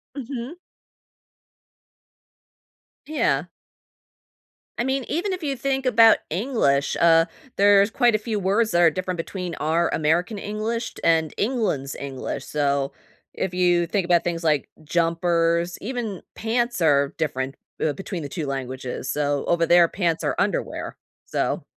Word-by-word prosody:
Mhm. 265 +2 -6 2.5
Yeah. 205 - +1 1.3
I 235 - +1
mean, 265 +1 0
even 370 +4 -1
if 365 -3 -5
you 280 -2 -1
think 270 0 -1
about 230 -2 +6
English, 165 - +1
uh, 165 -1 +6 0.3
there's 200 +1 +5
quite 240 -3 +3
a - - +4
few 215 0 -3
words 205 +3 +1
that 175 0 +3
are 170 - +7
different 185 0 -3
between 180 +1 -5
our 165 +2 +1
American 175 +7 +1
English 215 +3 -3
t - - -11
and 160 -2 +2
England's 205 - -1
English. 135 -2 -5
So, 140 -2 0 0.4
if 190 - -2
you 175 -1 +3
think 190 +1 -1
about 175 -1 +3
things 170 -1 -2
like 150 -3 +1
jumpers, 170 +1 +1
even 225 -5 -4
pants 235 -2 -1
are 140 -3 +3
different, 135 -3 -2 0.3
uh, 150 - +1
between 190 -4 -6
the 140 - -6
2 160 -2 -4
languages. 130 -1 -4
So 145 -1 0
over 170 -1 +2
there, 170 0 +6
pants 170 -3 -1
are - - 0
underwear. - - -2 0.3
So - - -1
175 Hz, 140 wpm, -23 LUFS, 155-225 Hz, 2.5 s, are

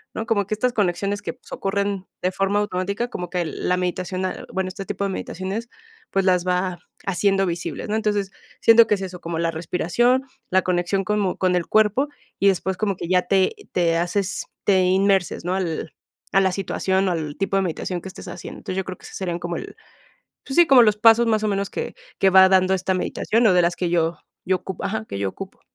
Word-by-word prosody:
¿no?, 220 - -3
como 205 -4 +1
que 215 - -2
estas 250 +4 +1
conexiones 200 0 0
que - - -4
pues - - -20
ocurren 200 -1 -2
de 185 - +1
forma 195 +2 +1
automática, 200 +3 -2
como 180 -5 -5
que 180 -1 -1
la 165 +3 -1
meditación, 185 +1 -2
ah 185 - -4
bueno, 190 0 -1
este 195 +1 -7
tipo 200 +1 -3
de - - -1
meditaciones, 190 +5 -4 0.4
pues, 195 - +1
las 180 -2 +3
va 180 0 0 0.3
haciendo 195 +1 +2
visibles, 175 +3 -4
¿no?, 210 - 0
entonces, 205 -3 0 0.3
siento 230 0 +7
que 210 - +3
es 195 - -7
eso, 180 -1 -6
como 165 -1 -4
la 165 0 +1
respiración, 180 +10 +1 0.3
la 190 +1 +4
conexión 180 +2 0
como 205 -3 0
con 185 -1 +2
el 175 - -1
cuerpo, 215 +6 +3 0.3
y 200 - +4
después 190 0 -1
como 200 -2 0
que 170 - -5
ya 180 -1 +3
te 190 - +2 0.2
te 170 -2 +2
haces 185 +3 -1 0.2
te 190 -2 +4
inmerses, 190 0 +2
¿no?, 180 +1 0
al 170 -4 -3 0.4
a 195 - +6
la 190 -1 +2
situación 190 0 0
o - - 0
al 155 -4 -3
tipo 195 0 0
de - - +3
meditación 180 +1 -3
que - - -8
estés - - -11
haciendo, - - -8
entonces, 185 - -5
yo 190 - -1
creo 185 - -6
que - - -23
ese - - -10
serían 175 -3 -3
como 175 0 -4
el - - -8 0.7
pues, 270 - -4
sí, 345 - +7
como 265 -4 +7
los 210 -2 +4
pasos 225 +2 +6
más 215 -1 +1
o - - +2
menos 200 0 -1
que - - -4 0.2
que 195 - +4
va 190 0 +8
dando 190 0 +4
esta 190 0 0
meditación, 225 +5 +1
o 200 - +5
de 180 - +5
las 170 0 +1
que 175 -2 -1
yo 170 -1 +1 0.3
yo 185 0 +3
ocupo 190 0 -7
ajá, 110 - -2
que 100 - -5
yo 100 - 0
ocupo. 190 - -10
190 Hz, 225 wpm, -22 LUFS, 180-200 Hz, 0.7 s, va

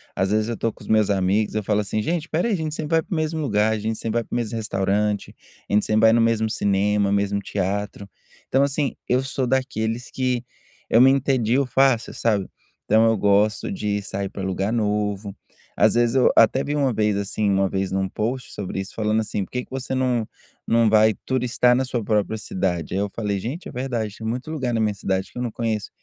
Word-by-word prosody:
às 95 - 0
vezes 110 0 +1
eu 120 - -2
estou 115 - -1
com - - -20
os - - -12
meus 110 -2 +3
amigos, 100 +2 +1
eu 110 - 0
falo 105 +1 +1
assim: 105 +1 -2
"Gente, 165 +6 -1
espera 160 +6 -1
aí 230 - +1
a - - +1
gente 155 -2 -3
sempre 155 +1 -1
vai 160 - +3
para - - -6
o - - 0
mesmo 160 0 -1
lugar, 110 -5 +2
a 110 - -2
gente 110 +1 -2
sempre 115 0 -2
vai - - -3
para - - -12
o - - 0
mesmo 115 -2 -2
restaurante, 105 0 -1 0.3
a - - -3
gente 105 - +3
sempre 110 0 +2
vai 110 0 +6
no 115 - +4
mesmo 115 -1 +2
cinema, 100 0 +1
mesmo 100 0 +1
teatro.". 100 +1 -3 0.4
Então 135 +1 +3
assim, 140 0 -1
eu 125 +1 +2
sou 135 0 -2
daqueles 125 -3 -1
que 125 -2 -1 0.5
eu 115 - +5
me 130 - +8
entedio 135 -1 +2
fácil, 130 -2 +2
sabe. 105 -4 0 0.4
Então 110 +2 +4
eu 115 -1 +3
gosto 105 +1 +2
de 105 +1 -2
sair 100 0 -4
para 95 - -7
lugar 95 +2 -1
novo, 105 -2 -1 0.4
às - - +3
vezes 120 +1 +2
eu 130 - +5
até 115 +4 +5
vi 145 - -2
uma 140 -4 +1
vez 105 -2 +1
assim, 100 +1 -1
uma 95 0 +2
vez 95 0 -2
em 95 - 0
um 95 0 0
post 120 +6 -3
sobre 95 -1 -4
isso 95 +1 -6
falando 110 0 +1
assim: 105 -2 -3
"Por - - -24
que 125 0 -3
que - - -42
você 135 0 -4
não 125 -4 0 0.4
não 115 -1 +4
vai 110 0 +5
turistar 125 -1 +2
na 130 - +1
sua 125 -3 -3
própria 105 +1 0
cidade?". 90 -6 -2
Aí 95 - 0
eu 100 0 -1
falei: 105 -3 -2
"Gente, 135 - -5
é - - -8
verdade, 120 -5 -3
tem 110 - -8
muito 125 +6 -3
lugar 130 -6 -2
na 115 - 0
minha 110 -1 +1
cidade 95 -1 -2
que - - -12
eu - - -3
não 120 -2 -2
conheço.". 110 -2 -2
110 Hz, 235 wpm, -23 LUFS, 100-125 Hz, 0.5 s, me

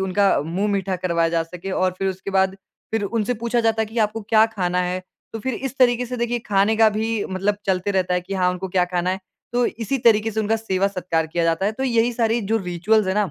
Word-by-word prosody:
उनका 190 +1 +2
मुँह 185 +7 -1
मीठा 190 -1 -1
करवाया 170 -2 +1
जा 165 0 +1
सके 180 +3 -8
और 185 -1 0
फिर 195 - 0
उसके 190 +1 -5
बाद, 190 0 +2 0.3
फिर 220 -1 -1
उनसे 230 +3 -1
पूछा 235 0 +1
जाता 225 -1 +2
है - - -3
कि 225 +2 -5
आपको 215 +1 +1
क्या 215 +1 +4
खाना 180 -5 -1
है, 180 +1 -2 0.3
तो 225 - -4
फिर 260 +2 -3
इस 270 +2 -5
तरीके 245 -1 +3
से 250 +1 -5
देखिए 240 0 -1
खाने 205 +2 +2
का 220 -1 +6
भी 225 -1 -1
मतलब 195 +2 0
चलते 190 +1 0
रहता 185 -2 +1
है 180 - +1
कि 195 +2 -6
हाँ 180 -1 +2
उनको 180 +1 -4
क्या 180 0 +2
खाना 180 0 -1
है, 190 +1 -3 0.3
तो 245 0 +2
इसी 250 +4 -2
तरीके 225 -2 +4
से 220 +1 -1
उनका 220 +1 +1
सेवा-सत्कार 185 -6 -1
किया 170 +1 -1
जाता 165 +4 +1
है, 215 - 0
तो 265 +4 -3
यही 235 -1 +2
सारी 230 0 +1
जो - - +4
रिचुअल्स 190 +3 +1
हैं 190 - 0
ना, 210 -3 +1
200 Hz, 250 wpm, -22 LUFS, 185-225 Hz, 0.3 s, का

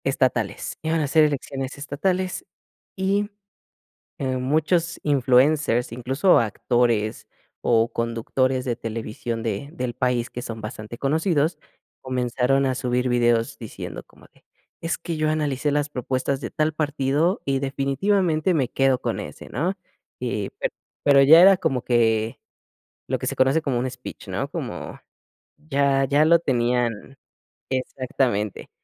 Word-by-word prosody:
Estatales, - - 0
iban 160 +1 0
a 145 - 0
ser 155 +2 +5
elecciones 135 -1 -3
estatales 180 - -2 0.5
y, 200 +2 0 0.9
eh, 130 -4 -2
muchos 160 +6 +1
influencers, 135 -2 +3
incluso 135 +10 +3
actores 115 -1 0 0.3
o 115 0 +2
conductores 125 +3 0
de 125 - -1
televisión 115 0 -4
de 110 +4 -3
del 125 -7 -3
país 125 -1 0
que 125 - -6
son 115 -2 -6
bastante 110 +1 -7
conocidos, 155 +4 +1 0.4
comenzaron 130 +1 +1
a 130 -1 +1
subir 125 0 0
videos 120 -1 +2
diciendo 115 - -7
como - - -21
de: - - -27 0.4
"Es 165 +1 -1
que 165 -1 -5
yo 155 0 +1
analicé 150 -2 0
las 145 0 0
propuestas 130 +1 -2
de - - -5
tal 155 -1 0
partido 150 - 0
y 135 -1 +1
definitivamente 155 +6 +1
me 135 -6 +1
quedo 135 -2 +2
con - - -2
ese", - - -9
¿no?, 170 +9 -1 0.5
eh, 110 -5 -2
pero - - -2 0.3
pero 140 -1 +6
ya 155 +5 +9
era 195 +1 +8
como 130 -9 0
que 115 -2 +1 0.7
lo - - 0
que - - -5
se - - -2
conoce 135 +5 +3
como 135 -5 0
un 130 +2 -1
speech, 125 0 -10
¿no?, - - -3
como - - -6 0.6
ya 140 -2 +1
ya 145 +3 +3
lo 170 +2 +6
tenían 120 -3 -1 0.5
Exactamente, 130 -5 -2
135 Hz, 140 wpm, -23 LUFS, 120-155 Hz, 0.9 s, ya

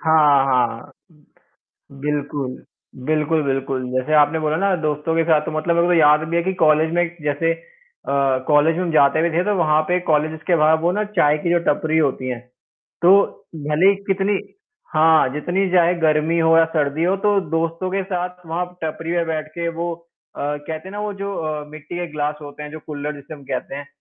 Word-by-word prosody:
हाँ, 150 -4 +4
हाँ 120 -3 0 0.2
उम, 150 -2 -25 0.8
बिल्कुल। 145 -2 -3 0.4
बिल्कुल, 155 0 +1
बिल्कुल 135 -1 -2
जैसे 130 +4 0
आपने 150 +1 +4
बोला 155 0 0
ना, 195 +2 +1
दोस्तों 150 +1 -1
के 165 - +3
साथ 160 -2 +3
तो - - -2
मतलब 170 +2 0
मेरे 170 - +3
को 180 - +2
तो - - +4
याद 150 -1 +5
भी 170 - -1
है 170 - +2
कि 190 - -1
कॉलेज 155 +1 +3
में 175 - +3
एक 175 0 -4
जैसे 150 +3 0
अ, 165 - -3
कॉलेज 155 +2 +4
में 180 - -1
हम 175 - -2
जाते 145 +1 +4
भी 170 - +1
थे, 170 +2 +1
तो 210 - +1
वहाँ 155 -2 +3
पे 180 - +2
कॉलेजेज़ 155 0 +1
के 175 -2 +3
बाहर 155 +1 +4
वो 170 +2 +1
ना 210 +2 -1
चाय 150 -2 +4
की 175 0 +3
टपरी 160 -4 +1
होती 135 -4 0
हैं। 125 -2 -4 0.6
तो 175 +2 +7 0.6
भले 160 +6 +4
ही - - +2 0.2
कितनी 195 +1 +1 0.6
हाँ, 160 -2 +5
जितनी 180 +6 -1
चाहे 175 0 +4
गर्मी 155 +1 +2
हो 165 0 +4
या 165 - +6
सर्दी 150 +1 0
हो, 185 +3 +2
तो 205 0 +2
दोस्तों 165 +3 -1
के 195 +1 -1
साथ 180 -1 -5
वहाँ 170 +2 -2 0.2
टपरी 160 +1 -4
पे 170 -1 +1
बैठ 155 -1 -3
के 170 0 -1
वो 170 0 -2 0.4
अ, - - -7
कहते 150 +4 -4
है - - -10
ना 205 - -5
वो 210 0 -3
जो 200 0 -3
अ, 155 -2 -3
मिट्टी 155 +2 -9
के 175 0 -3
ग्लास 150 0 -2
होते 145 +1 -9
हैं, 150 - -7
जो 155 - -7
कुल्हड़ 150 0 -5
जिसे 140 +2 -10
हम 145 - -14
कहते 130 +1 -4
हैं, 145 0 -7
160 Hz, 215 wpm, -20 LUFS, 150-175 Hz, 0.8 s, तो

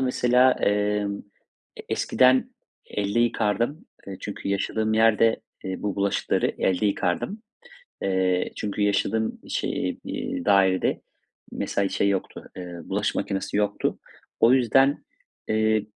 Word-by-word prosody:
mesela, 125 0 +4
emm, 105 0 0 0.6
e - - -8
eskiden 130 0 +3 0.4
elde 105 +3 -1
yıkardım, 120 - 0 0.2
eee, 95 - -6
çünkü 100 -1 -6
yaşadığım 110 +2 0
yerde, 115 0 +4 0.2
eee, 95 0 -5
bu 105 -1 -2
bulaşıkları 100 0 0
elde 95 +3 +1
yıkardım. 100 - -1 0.6
Eee, 95 -1 +1
çünkü 105 0 -3
yaşadığım 110 +2 0
şe - - -2
iii, - - -4
dairede, 95 -2 +3 0.5
mesela, 100 -1 -1
şey 100 - +1
yoktu, 95 -1 -3
ııı, 90 -2 -8
bulaşık - - -1
makinesi 95 +1 -2
yoktu. 105 -1 0 0.4
O 115 +2 +6
yüzden, 135 +2 +3 0.4
eee, 110 -1 +1
105 Hz, 115 wpm, -25 LUFS, 100-115 Hz, 0.6 s, O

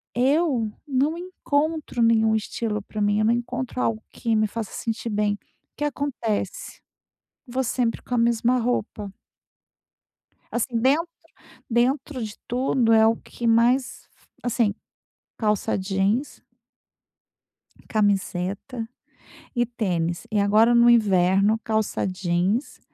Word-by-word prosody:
eu 260 -3 +2 0.2
não 285 +4 +1
encontro 315 -6 -2
nenhum 220 -1 +4
estilo 215 -1 -2
pra 210 +1 -5
mim, 205 0 +2
eu 215 - +2
não 230 - +4
encontro 250 +1 -3
algo 220 -1 -1
que 230 -2 -1
me 215 0 +3
faça 220 0 -5
sentir 230 0 -3
bem. 210 -1 +1
O - - -6 0.4
que - - -3
acontece, 285 - -3 0.7
vou 255 +2 -1
sempre 235 -1 -1
com 250 - -3
a - - +1
mesma 235 +1 +2
roupa. 215 -4 -2 1.4
Assim, 240 0 -1
dentro 285 +8 +2 0.6
dentro 255 +2 0
de 215 -1 -5
tudo 245 -2 +1
é 220 0 +6
o 225 - +3
que 240 - -7
mais 240 +3 +2
f - - -29 0.2
assim, 230 -4 +1 0.6
calça 210 -3 0
jeans 195 +7 -1 1.5
camiseta 205 +2 -1 0.7
e 240 -1 +1
tênis. 175 -8 -2
E 215 - 0
agora 215 +4 +4
no 235 0 +6
inverno, 200 -1 +4
calça 220 -2 0
jeans, 185 +6 -1
230 Hz, 125 wpm, -24 LUFS, 210-250 Hz, 1.5 s, é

